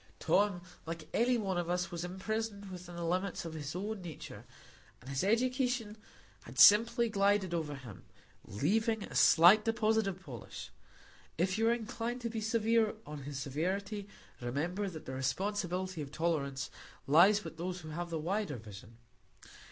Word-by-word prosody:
Tom, 200 Hz, -3 st, +2 dB, 0.3 s
like 165 Hz, -2 st, -5 dB
every 245 Hz, +2 st, +3 dB
one 195 Hz, -5 st, -1 dB
of 175 Hz, -1 st, -3 dB
us, 180 Hz, +1 st, -1 dB
was 170 Hz, -1 st, -4 dB
imprisoned 200 Hz, +2 st, -4 dB
within 180 Hz, -1 st, -9 dB
the 170 Hz, 0 st, -4 dB
limits 180 Hz, +2 st, -1 dB
of 165 Hz, -, -5 dB
his 150 Hz, 0 st, -5 dB
own 205 Hz, +2 st, -3 dB
nature, 170 Hz, -4 st, -9 dB, 0.5 s
and 130 Hz, +3 st, -10 dB
his 135 Hz, +3 st, -1 dB
education 245 Hz, 0 st, +1 dB, 0.5 s
had 120 Hz, +2 st, -11 dB
simply 230 Hz, -, +7 dB
glided 200 Hz, -3 st, +2 dB
over 155 Hz, -4 st, -2 dB
him, 120 Hz, -8 st, -11 dB, 0.4 s
leaving 215 Hz, -, 0 dB
a -, -, -9 dB
slight 180 Hz, +6 st, +7 dB
deposit 220 Hz, -1 st, +2 dB
of 190 Hz, -1 st, -3 dB
polish; 130 Hz, -, -9 dB, 0.7 s
if 185 Hz, +3 st, +1 dB
you 225 Hz, +1 st, +3 dB
are -, -, +4 dB
inclined 235 Hz, +1 st, -3 dB
to 235 Hz, -2 st, -4 dB
be 220 Hz, -1 st, -3 dB
severe 225 Hz, 0 st, +2 dB
on 150 Hz, -1 st, -7 dB
his 145 Hz, -1 st, -5 dB
severity, 195 Hz, +9 st, -2 dB, 0.3 s
remember 170 Hz, +11 st, -2 dB
that 160 Hz, -4 st, -9 dB
the 130 Hz, -, -6 dB
responsibility 185 Hz, +5 st, -2 dB
of 140 Hz, -2 st, -7 dB
tolerance 140 Hz, -5 st, -1 dB, 0.3 s
lies 185 Hz, +9 st, +6 dB
with 165 Hz, -, -8 dB
those 180 Hz, +1 st, -4 dB
who 155 Hz, -, -9 dB
have 170 Hz, +3 st, -4 dB
the 165 Hz, -, -2 dB
wider 175 Hz, 0 st, -2 dB
vision. 105 Hz, 0 st, -12 dB
185 Hz, 160 wpm, -33 LUFS, 155-215 Hz, 0.7 s, simply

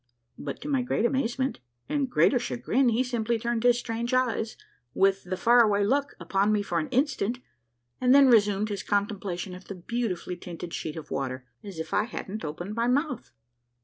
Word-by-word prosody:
" 120 Hz, +1 st, -47 dB
but -, -, -5 dB
to -, -, -7 dB
my 275 Hz, -3 st, +1 dB
great 245 Hz, -2 st, 0 dB
amazement 260 Hz, +1 st, 0 dB, 0.3 s
and 285 Hz, -3 st, 0 dB
greater 250 Hz, 0 st, +4 dB
chagrin 245 Hz, +1 st, +1 dB
he 235 Hz, +2 st, +2 dB
simply 235 Hz, -2 st, -1 dB
turned 235 Hz, 0 st, -1 dB
his 245 Hz, 0 st, +4 dB
strange 235 Hz, +1 st, -2 dB
eyes, 230 Hz, -3 st, 0 dB, 0.4 s
with 195 Hz, 0 st, +3 dB
the 185 Hz, +1 st, -3 dB
faraway 225 Hz, -3 st, +5 dB
look, 280 Hz, +7 st, +1 dB
upon 195 Hz, +4 st, +1 dB
me 210 Hz, -1 st, +2 dB
for 175 Hz, -3 st, -1 dB
an 155 Hz, -, -3 dB
instant, 255 Hz, -4 st, 0 dB, 0.6 s
and 250 Hz, 0 st, +4 dB
then 280 Hz, -1 st, +8 dB
resumed 210 Hz, -3 st, +4 dB
his 200 Hz, -2 st, -3 dB
con 205 Hz, -1 st, +1 dB
templation 190 Hz, -3 st, -5 dB
of 185 Hz, -, -12 dB
the 200 Hz, -, -7 dB
beautifully 185 Hz, -2 st, -3 dB
tinted 175 Hz, -1 st, -8 dB
sheet 155 Hz, -, -4 dB
of 155 Hz, -2 st, -9 dB
water, 130 Hz, -1 st, -3 dB, 0.2 s
as 200 Hz, -4 st, -8 dB
if 160 Hz, -, -5 dB
I 210 Hz, -, +2 dB
hadn't 215 Hz, -2 st, -6 dB
opened 175 Hz, +6 st, -5 dB
my 230 Hz, +2 st, 0 dB
mouth. 260 Hz, -1 st, 0 dB
220 Hz, 190 wpm, -27 LUFS, 190-245 Hz, 0.6 s, then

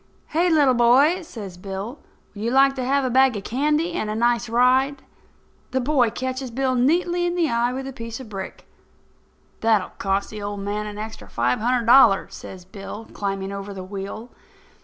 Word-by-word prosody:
"Hey, 340 Hz, +3 st, +2 dB
little 290 Hz, -5 st, +4 dB
boy!" 260 Hz, +9 st, +4 dB
says 205 Hz, -, -9 dB
Bill, 200 Hz, +8 st, -6 dB, 0.3 s
"would 205 Hz, -, -9 dB
you 230 Hz, -, 0 dB
like 270 Hz, +2 st, +5 dB
to 260 Hz, -2 st, -4 dB
have 275 Hz, +1 st, +1 dB
a -, -, 0 dB
bag 260 Hz, -1 st, +4 dB
of 200 Hz, -, -6 dB
candy 300 Hz, -, 0 dB
and 215 Hz, -11 st, -2 dB
a 215 Hz, -, -2 dB
nice 235 Hz, +1 st, +1 dB
ride?" 260 Hz, +4 st, +2 dB, 0.7 s
The 260 Hz, -, 0 dB
boy 255 Hz, -2 st, +2 dB
catches 260 Hz, +2 st, -4 dB
Bill 260 Hz, +2 st, 0 dB
neatly 345 Hz, +8 st, +2 dB
in 350 Hz, -, -2 dB
the 335 Hz, -5 st, +1 dB
eye 235 Hz, +1 st, +1 dB
with 265 Hz, +1 st, -5 dB
a 270 Hz, -, -6 dB
piece 230 Hz, -1 st, -7 dB
of 260 Hz, -, -9 dB
brick. 195 Hz, -3 st, -8 dB, 0.9 s
"That 225 Hz, -2 st, +3 dB
will 185 Hz, -, -7 dB
cost 195 Hz, +1 st, -1 dB
the 215 Hz, -1 st, -7 dB
old 205 Hz, 0 st, -4 dB
man 205 Hz, +1 st, -3 dB
an 210 Hz, 0 st, -7 dB
extra 220 Hz, +1 st, -8 dB
five 120 Hz, +1 st, 0 dB
hundred 240 Hz, +1 st, +1 dB
dollars," 235 Hz, -5 st, +5 dB
says 185 Hz, -2 st, -10 dB
Bill, 200 Hz, +3 st, -9 dB
climbing 195 Hz, -1 st, -3 dB
over 200 Hz, 0 st, -6 dB
the 190 Hz, -, -6 dB
wheel. 200 Hz, +5 st, -7 dB
235 Hz, 195 wpm, -23 LUFS, 205-270 Hz, 0.9 s, like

